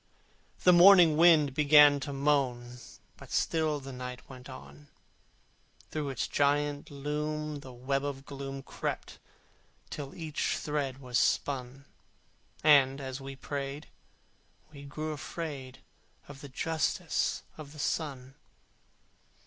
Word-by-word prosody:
The 180 - +7
morning 175 -3 +8
wind 155 -4 +5
began 145 0 +6
to 140 +1 -5
moan, 130 -4 0 0.4
But - - -13
still 155 -2 0
the 135 0 -9
night 125 0 -8
went 130 0 -12
on: 140 +3 -12 1.0
Through 150 -2 -3
its 125 -3 -2
giant 145 0 0
loom 150 +1 -4
the 130 -2 -11
web 135 +3 -2
of 140 -1 -5
gloom 135 -1 -7
Crept - - -5 0.7
till 140 -2 -7
each 160 -2 -2
thread 145 -3 -3
was 125 -4 -1
spun: 135 0 -1 0.8
And, 140 -3 +5
as 135 -1 -6
we 135 0 -8
prayed, 140 +2 -6 0.8
we 140 -2 -11
grew 155 +2 -5
afraid 140 -2 -7 0.4
Of 145 -1 -11
the 145 - -9
Justice 160 +4 -1
of 150 -2 -10
the 150 - -13
Sun. 135 -4 -3
140 Hz, 120 wpm, -30 LUFS, 135-150 Hz, 1.0 s, morning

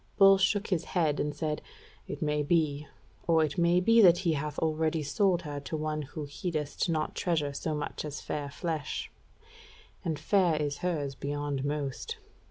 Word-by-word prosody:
Bull 195 -1 +7
shook 200 +2 +2
his 175 -4 0
head, 155 -4 +2
and 150 0 -1
said: 150 0 -2 0.5
"It - - -4
may 150 0 +1
be: 150 -1 +1 0.4
or 165 -2 +4
it 155 +4 -2
may 170 +1 +4
be 230 +5 +5
that 175 -4 +7
he 165 - +3
hath 150 -1 -3
already 160 0 0
sold 180 +3 +2
her 145 -2 -4
to 150 +3 -4
one 155 0 -2
who 150 +2 -6
heedeth 150 +2 -3
not 155 -2 0
treasure 155 -5 0
so 155 +2 -2
much 150 - -4
as 150 -2 -5
fair 145 -1 -4
flesh; 155 0 -3 0.9
and 160 -2 -1
fair 185 -3 +3
is 145 -1 -2
hers 150 -6 -1
beyond 145 0 -3
most. 145 - -3
155 Hz, 175 wpm, -30 LUFS, 145-170 Hz, 0.9 s, Bull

